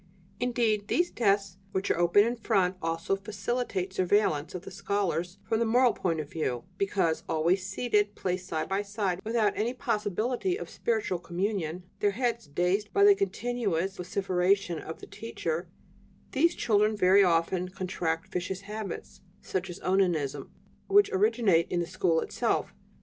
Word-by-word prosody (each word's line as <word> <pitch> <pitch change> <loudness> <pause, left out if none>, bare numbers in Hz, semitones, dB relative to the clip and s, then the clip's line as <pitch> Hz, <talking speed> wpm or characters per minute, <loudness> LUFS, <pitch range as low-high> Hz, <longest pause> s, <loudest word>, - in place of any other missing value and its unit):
"Indeed, 235 -4 +1
these 350 +7 +1
desks 195 -4 +1 0.2
which 190 +1 0
are - - +1
open 175 +4 +5
in 235 +1 -1
front 190 -5 +1
also 165 +3 -1
facilitate 200 -1 -3
surveillance 185 -5 +1
of 180 - -5
the - - -9
scholars 190 -2 -2
from 220 - 0
the - - +3
moral 245 +1 +4
point 165 -3 -1
of 150 - -4
view; 130 -6 -2 0.2
because, 190 -5 +1
always 170 +4 +2
seated, 210 -1 0
placed 185 0 -3
side 160 -3 -2
by 195 +1 0
side 200 -3 -2
without 220 -2 +1
any 235 +4 -1
possibility 240 - -1
of - - -8
spiritual 425 - -1
communion, 180 -1 -2 0.2
their 205 - +3
heads 235 - -1
dazed 180 +7 0
by 400 - +3
the 405 0 +9
continuous 235 - -1
vociferation 180 -1 0
of 160 - -8
the - - -8
teacher, 170 -6 -4 0.6
these 335 +6 +3
children 210 -1 +2
very 195 +1 +6
often 175 +1 +1
contract 175 -3 -3
vicious 185 +1 -3
habits, 210 -2 -7 0.2
such 185 0 -3
as 175 - -7
onanism, 175 -7 0 0.4
which 405 +1 +5
originate 205 -4 +3
in 175 - +1
the 170 - 0
school 175 -2 +1
itself. - - -1
195 Hz, 155 wpm, -29 LUFS, 175-220 Hz, 0.6 s, the